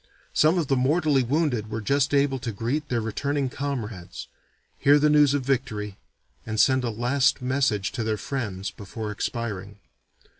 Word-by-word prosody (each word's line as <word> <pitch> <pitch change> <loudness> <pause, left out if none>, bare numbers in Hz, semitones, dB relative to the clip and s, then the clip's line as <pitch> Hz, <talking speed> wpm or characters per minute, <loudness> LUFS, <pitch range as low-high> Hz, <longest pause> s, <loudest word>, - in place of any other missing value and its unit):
Some 155 +4 +4
of 170 - +1
the 135 - +1
mortally 145 +2 +2
wounded 125 -4 0
were 110 - -3
just 140 +6 +1
able 140 -2 +2
to 120 -2 -4
greet 125 +9 -2
their 120 -2 0
returning 140 +5 -1
comrades, 115 -11 -5 0.5
hear 145 +1 +6
the 150 +1 +3
news 145 -2 +5
of 140 - -1
victory, 110 -7 -2 0.4
and 110 -1 -3
send 130 +1 +4
a 120 - 0
last 120 +6 +1
message 125 -6 0
to 125 -3 -3
their 110 -1 -1
friends 100 -7 -4
before 105 +2 -6
expiring. 105 -2 -4
130 Hz, 160 wpm, -25 LUFS, 110-140 Hz, 0.5 s, hear